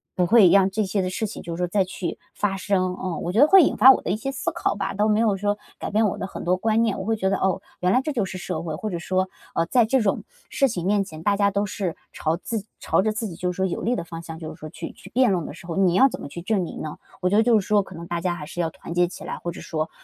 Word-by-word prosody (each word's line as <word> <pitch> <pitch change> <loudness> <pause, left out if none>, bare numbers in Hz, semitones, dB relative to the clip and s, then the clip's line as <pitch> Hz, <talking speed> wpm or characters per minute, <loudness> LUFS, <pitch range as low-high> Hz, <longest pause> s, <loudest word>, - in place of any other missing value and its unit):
不 180 - +2
会 200 0 +7
让 195 +1 +5
这 215 +2 0
些 195 +1 0
的 185 - -1
事 215 +4 -2
情 210 - -8
就 170 - -5
是 - - -7
说 180 0 0
再 195 +2 +2
去 185 -1 -5 0.2
发 205 -2 0
生， 185 -1 0
嗯。 185 -3 -2
我 175 - -2
觉 210 - +1
得 295 - +8
会 385 +3 +8
引 - - +1
发 255 +6 +9
我 - - +2
的 - - -4
一 - - +1
些 250 +6 -4
思 270 - -2
考 - - -1
吧， 200 - -3
倒 210 +2 +1
没 210 0 +3
有 220 -3 +3
说 205 +1 0 0.2
改 - - -4
变 215 +2 +3
我 190 - -3
的 - - -3
很 - - -7
多 180 +1 +3
观 220 +4 +1
念， 225 -3 +1
我 - - -4
会 225 +1 +1
觉 190 -2 +1
得， 195 - +1
哦， 190 -2 0 0.2
原 180 0 +2
来 250 - +4
这 305 - -3
就 235 -6 0
是 185 - -6
社 180 -3 -4
会， 160 -2 -4
或 215 +7 -4
者 175 -3 -3
说， 185 +2 0 0.3
呃， 165 - +2
在 235 +6 +3
这 265 +4 +2
种 200 -3 0 0.3
事 275 - +2
情 175 -7 -3
面 200 +1 +2
前， 160 -5 -10
大 205 +2 +3
家 200 0 +2
都 200 +1 0
是 190 -4 -3 0.2
朝 160 +2 -1
自 215 +3 -4 0.2
朝 - - +2
着 215 - +1
自 215 +1 -3
己 175 - -8
就 180 +2 -2
是 180 - -10
说 190 - +1
有 180 - -2
利 240 +3 +1
的 - - -3
方 165 0 -8
向， 160 -1 -8
就 160 -1 -6
是 160 - -17
说 155 - -7
去 - - -7
去 185 - -14
辩 250 +3 +3
论 175 -4 0
的 - - -7
时 170 - -13
候， 165 - -4
你 185 -2 +3
要 265 +8 +7
怎 - - -7
么 - - -6
去 170 - -7
证 195 +2 0
明 170 - -6
呢？ 155 - -6 0.2
我 180 - +2
觉 200 - +2
得 220 - +5
就 230 -2 +4
是 195 - -6
说 210 -1 +3
可 190 - -13
能 170 +1 -8
大 170 -1 -2
家 175 0 0
还 150 - -7
是 175 +3 -4
要 165 - 0
团 165 - -9
结 175 0 +3
起 - - -10
来， - - -4
或 175 - -4
者 - - -9
说， 155 0 -3
190 Hz, 360 characters per minute, -24 LUFS, 175-215 Hz, 0.3 s, 发